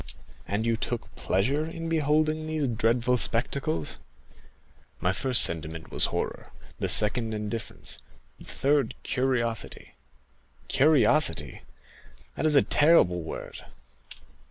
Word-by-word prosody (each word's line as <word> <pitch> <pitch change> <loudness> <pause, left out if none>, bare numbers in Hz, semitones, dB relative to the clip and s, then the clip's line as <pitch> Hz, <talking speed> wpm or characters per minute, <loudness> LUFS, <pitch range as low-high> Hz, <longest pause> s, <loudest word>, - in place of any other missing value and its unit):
"And 105 +3 -2
you 115 -1 +1
took 120 +1 -5
pleasure 130 +11 0
in 165 +1 -6
beholding 155 0 +1
these 155 -3 -1
dreadful 120 +2 +1
spectacles?" 115 - 0 1.0
"My 90 - 0
first 130 +4 +3
sentiment 80 -1 -2
was - - +4
horror, - - -4 0.3
the - - -1
second 110 +1 +1
indifference, 105 +1 -4 0.4
the - - -13
third 140 -1 0
curiosity." 120 -4 -2 0.8
"Curiosity—that 135 - 0
is 150 - +3
a 140 - +6
terrible 145 - +4
word." 80 - -8
120 Hz, 105 wpm, -27 LUFS, 105-150 Hz, 1.0 s, a